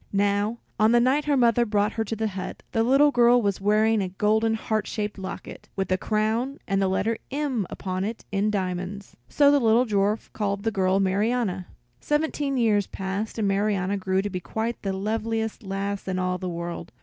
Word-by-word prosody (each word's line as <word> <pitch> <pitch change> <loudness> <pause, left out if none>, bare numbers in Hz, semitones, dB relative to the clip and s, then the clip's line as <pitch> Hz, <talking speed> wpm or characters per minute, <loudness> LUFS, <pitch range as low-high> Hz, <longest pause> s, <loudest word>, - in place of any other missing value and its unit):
Now, 205 +3 +1 0.2
on 215 +2 +5
the 240 - +6
night 265 +5 +2
her 290 -2 +2
mother 240 -1 +4
brought 210 -1 +1
her 225 - -1
to 225 - -3
the 220 0 -1
hut, 190 -1 -6
the 225 - +1
little 275 +5 +5
girl 245 -1 +5
was 200 -4 -1
wearing 215 +2 +3
a 190 - -2
golden 220 +4 +1
heart 220 -1 -2
shaped 210 -2 -3
locket, 190 0 -8
with 190 -1 -2
a 185 - +3
crown 225 +7 0
and 195 0 +1
the 195 - +2
letter 215 +4 0
M 270 - -1
upon 185 -1 -3
it 220 +3 -5
in 200 +1 +1
diamonds. 190 0 -3
So 285 -1 +5
the 285 - +4
dwarf 220 -3 +2
called 200 -1 -1
the 225 - +2
little 200 -4 -1
girl 185 +1 +3
Marianna. 195 -1 0 0.3
Seventeen 295 - -1
years 210 -5 +2
passed, 195 +4 -4
and 215 -2 +1
Marianna 195 -1 +1
grew 190 0 0
to 205 - -2
be 185 - -3
quite 220 +6 -3
the 195 - -2
loveliest 220 +3 -2
lass 200 0 -4
in 185 -1 -1
all 185 0 -1
the 185 - -3
world. 170 -5 -5
210 Hz, 195 wpm, -25 LUFS, 195-230 Hz, 0.3 s, the